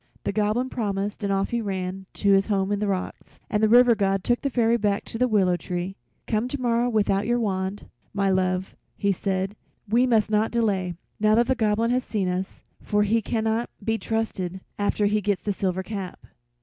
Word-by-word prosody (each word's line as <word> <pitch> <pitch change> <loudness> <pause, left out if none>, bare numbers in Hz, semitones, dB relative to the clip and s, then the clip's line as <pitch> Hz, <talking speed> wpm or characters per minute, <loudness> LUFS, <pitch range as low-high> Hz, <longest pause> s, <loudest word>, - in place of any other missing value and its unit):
The - - -1
Goblin 215 +5 +1
promised 205 -2 -2
and 200 - 0
off 195 0 0
he 235 -1 0
ran 190 -2 -4
to 200 - +2
his 195 0 +4
home 195 -2 0
in 205 - 0
the 210 - -1
rocks, 190 -2 -4
and 210 - +1
the 220 - +4
River 245 +1 +7
God 195 -3 0
took 240 0 +1
the 280 - 0
Fairy 235 -2 +2
back 205 -3 0
to 225 - -6
the 250 - +3
willow 195 -6 +3
tree. 180 +1 -4 0.3
"Come 220 +2 0
tomorrow 245 -2 0
without 205 -3 +1
your 240 0 +2
wand, 195 -2 -2 0.3
my 200 0 0
love," 185 0 0 0.2
he 200 - +1
said; 190 +1 -2 0.3
"we 240 +5 +3
must 220 -3 +2
not 215 +1 +2
delay, 195 -6 0 0.2
now 215 0 +4
that 235 +1 +4
the 260 - +2
Goblin 225 -1 +1
has 250 0 +1
seen 205 -6 -1
us, 185 +1 -3 0.2
for 210 0 +1
he 225 +2 +2
cannot 220 +1 -1
be 225 +1 0
trusted 190 -5 -2 0.2
after 205 +1 +1
he 210 +1 +2
gets 205 -1 -1
the 205 - 0
silver 190 -1 -1
cap." 195 -2 -6
205 Hz, 200 wpm, -25 LUFS, 195-225 Hz, 0.3 s, River